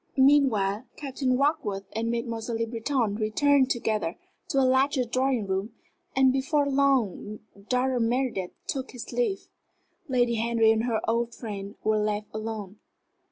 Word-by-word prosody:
Meanwhile, 260 -6 +3
Captain 265 -3 -1
Warkworth 215 -9 0
and 230 +1 -1
Mademoiselle 230 -1 -2
Le 230 - 0
Breton 230 -2 -1
returned 260 +5 +3
together 215 -8 -1 0.3
to - - -2
the 270 - +5
larger 260 0 +3
drawing 255 -1 0
room, 195 +4 -3 0.4
and 265 -1 +5
before 280 +2 +1
long 265 -7 +1 0.3
Dr. 255 0 +1
Meredith 235 -5 0
took 265 -1 -4
his 245 - -8
leave. 450 -6 -1 0.6
Lady 245 -3 +2
Henry 225 0 +3
and 225 +1 +1
her 230 -3 0
old 230 +1 0
friend 205 -3 -6
were 215 0 +2
left 210 0 -1
alone. 215 -2 -5
235 Hz, 140 wpm, -27 LUFS, 215-265 Hz, 0.6 s, the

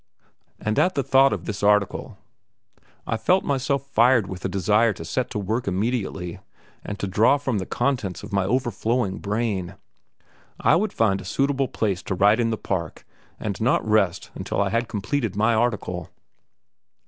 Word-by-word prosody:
And 110 0 0
at 185 - +2
the 140 - +1
thought 135 +1 +5
of 95 -5 -3
this 105 -2 -4
article 105 -1 +1 0.9
I 115 - -1
felt 185 +11 +2
myself 140 0 -1
fired 120 -3 +4
with 95 -1 -8
a - - -1
desire 105 +4 +2
to 80 -4 -9
set 125 +9 -2
to 120 - -4
work 110 +4 -2
immediately 95 -3 -2 0.4
and 105 - -5
to 100 - -3
draw 110 +8 +3
from 130 -6 -1
the 95 - -5
contents 120 -10 -1
of - - -9
my 100 -1 +2
overflowing 120 -2 0
brain. 100 -4 -2 0.8
I - - +4
would 205 +4 +1
find 100 -4 +1
a - - -9
suitable 135 +6 0
place 100 -6 -1
to 95 - -3
write 105 +5 +4
in 115 -1 +2
the 110 - -1
park 85 -7 -4 0.3
and 105 -1 -4
not 115 -1 +2
rest 105 -5 +1
until - - -4
I 100 -1 +2
had 115 +2 0
completed 105 +1 -2
my 110 +3 +3
article. 105 -7 -1
110 Hz, 170 wpm, -24 LUFS, 95-125 Hz, 0.9 s, thought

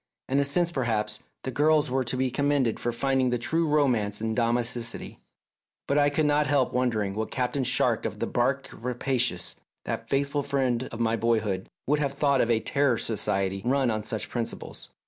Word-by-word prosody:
In 135 +2 +2
a - - +4
sense, 170 +5 +1
perhaps, 110 -7 -1 0.2
the 130 - -3
girls 150 +1 +3
were 130 0 +1
to 125 +2 -2
be 130 0 0
commended 140 -3 +1
for 120 - -1
finding 130 +1 +1
the 125 - +1
true 160 +8 0
romance 125 -9 +1
in 110 0 -1
domesticity, 120 0 -1 0.7
but 140 - +1
I 145 0 +4
could 150 +2 +1
not 150 0 +3
help 140 -3 +2
wondering 115 -6 0
what 110 +2 -3
Captain 130 +1 -1
Shark - - +2
of - - -3
the - - -1
barque - - 0
Rapacious, 125 -4 -1 0.3
that - - -4
faithful 140 +1 +1
friend 130 -3 0
of 115 - -7
my 115 -1 +2
boy 115 +1 +2
1 - - +2
hood, 95 -3 -3 0.2
would 150 +2 +2
have 140 -2 0
thought 140 -2 +3
of 120 - +1
a 115 -1 +3
Terror 140 +1 +1
Society 100 -4 0
run 130 0 +2
on 110 -1 -1
such 110 -1 -4
principles. 120 -2 -5
125 Hz, 195 wpm, -27 LUFS, 115-140 Hz, 0.7 s, a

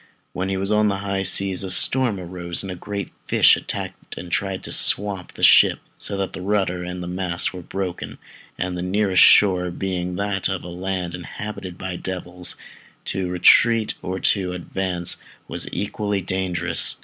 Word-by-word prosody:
When 95 +1 -2
he 95 - -1
was 100 +2 -1
on 105 0 +4
the 100 -1 0
high 100 -1 -1
seas 95 0 +2
a 95 - -4
storm 120 +2 +3
arose, 90 -1 -2
and 95 - -5
a - - -5
great 100 +1 -5 0.2
fish - - +6
attacked - - -6
and 90 - -8
tried 95 +1 -1
to - - -6
swamp 100 -3 0
the - - -8
ship, - - +7 0.2
so 100 - 0
that 95 -1 -2
the - - -6
rudder 95 -2 0
and 90 0 -5
mast 90 -1 -1
were 90 - -7
broken, 95 +1 -5 0.4
and 90 0 -2
the 90 - -3
nearest 95 0 +2
shore 90 -3 +6
being 90 0 -3
that 100 0 -1
of 95 -1 -3
a 90 - -7
land 90 0 -3
inhabited 90 0 -7
by 95 -1 -4
devils, 90 -1 -5 0.5
to 95 -1 -2
retreat 110 +5 +5
or 95 +1 -3
to 95 -3 +1
advance 90 0 -3 0.3
was - - -5
equally 105 -1 -2
dangerous. 90 -2 -1
95 Hz, 175 wpm, -22 LUFS, 90-100 Hz, 0.5 s, ship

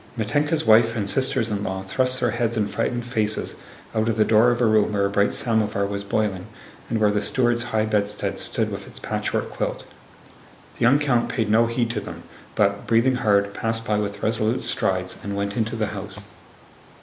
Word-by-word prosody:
Mítenka's 145 +8 0
wife 115 +1 +5
and 105 -3 -2
sisters 130 -1 0
in 100 -1 -2
law 95 -1 -3
thrust 130 +7 +1
their - - +1
heads 115 -1 -1
and 105 -2 +1
frightened 120 +2 -2
faces 110 -3 -1 0.4
out 110 +1 +1
of 115 - -1
the 110 - +4
door 110 +2 +5
of 120 0 0
a 120 - +3
room 110 -1 +3
where 100 -1 +2
a 100 - -1
bright 100 0 +2
samovar 105 -3 0
was 100 0 -3
boiling 100 -2 -1 0.4
and 115 - 0
where 105 -1 +3
the 105 0 0
steward's 120 +2 +1
high 110 -2 0
bedstead 105 -1 -1
stood - - 0
with - - -6
its - - -9
patchwork - - -2
quilt. - - -3 1.0
The - - -15
young 120 +4 +5
count 130 -5 +1
paid 110 -2 -1
no 115 +2 +4
heed 115 0 -1
to 110 -3 -3
them, - - -9 0.3
but, 100 -1 +1
breathing 120 +3 +3
hard, 100 -4 +2
passed 115 +1 -2
by 105 -2 +1
with 100 -1 -4
resolute 110 +2 0
strides 95 -1 -1
and 100 0 -4
went 100 0 -2
into 110 -1 -1
the 110 -1 0
house. 100 0 -6
110 Hz, 200 wpm, -23 LUFS, 100-120 Hz, 1.0 s, wife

